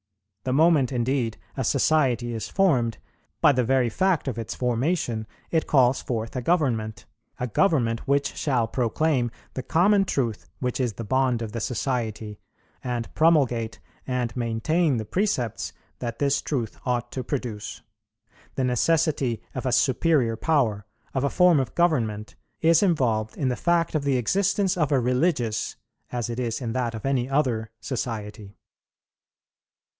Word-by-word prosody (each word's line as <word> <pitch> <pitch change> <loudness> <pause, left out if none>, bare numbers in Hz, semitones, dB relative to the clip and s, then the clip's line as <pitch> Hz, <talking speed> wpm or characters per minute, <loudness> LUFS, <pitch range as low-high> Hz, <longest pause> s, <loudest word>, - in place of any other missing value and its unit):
The 130 - 0
moment, 150 -3 +4
indeed, 120 -2 0 0.2
a 130 - -2
society 125 -3 +2
is 110 - -4
formed, 130 - +2 0.4
by - - +6
the 125 -2 +1
very 125 0 +2
fact 185 +4 +1
of 125 -3 -2
its 115 - -5
formation, 125 -2 -1 0.2
it 160 -1 +1
calls 130 -2 +4
forth 115 -1 -4
a 130 - -1
government, 120 -9 0 0.3
a 125 - -1
government 120 - +1
which 140 +1 +1
shall 125 -6 0
proclaim 125 +2 0 0.2
the 130 - -3
common 195 +9 +3
truth 115 - -2
which 125 0 -2
is 125 -4 0
the 115 - -6
bond 130 0 +1
of 110 - -5
the 115 - -4
society, 110 -4 -3 0.4
and 120 -2 -3
promulgate 125 -9 +2 0.3
and 125 -2 -2
maintain 125 +6 +1
the 110 - -3
precepts 125 - -1 0.3
that 120 -2 -4
this 140 -1 +1
truth 120 -7 -3
ought 120 -1 -1
to 130 - -4
produce. 120 -6 -5 0.7
The 135 - 0
necessity 135 -1 +1
of 130 0 -3
a - - +1
superior 130 -3 +2
power, 110 -6 0 0.3
of 130 - 0
a 140 - +2
form 180 -3 +5
of 130 -4 -3
government, 110 -12 +1 0.3
is 165 0 +5
involved 120 - +1
in 135 - 0
the 125 - 0
fact 170 +4 +1
of 155 -3 0
the 140 -2 +2
existence 195 - +1
of 155 -4 0
a 140 - +4
religious, 125 -2 0 0.4
as 120 -1 -2
it 120 +1 -4
is 115 -3 -2
in 120 -4 -3
that 120 -3 -1
of 110 - -7
any 135 -2 0
other 125 -6 0
society. 105 -5 -5
125 Hz, 155 wpm, -25 LUFS, 115-145 Hz, 0.7 s, by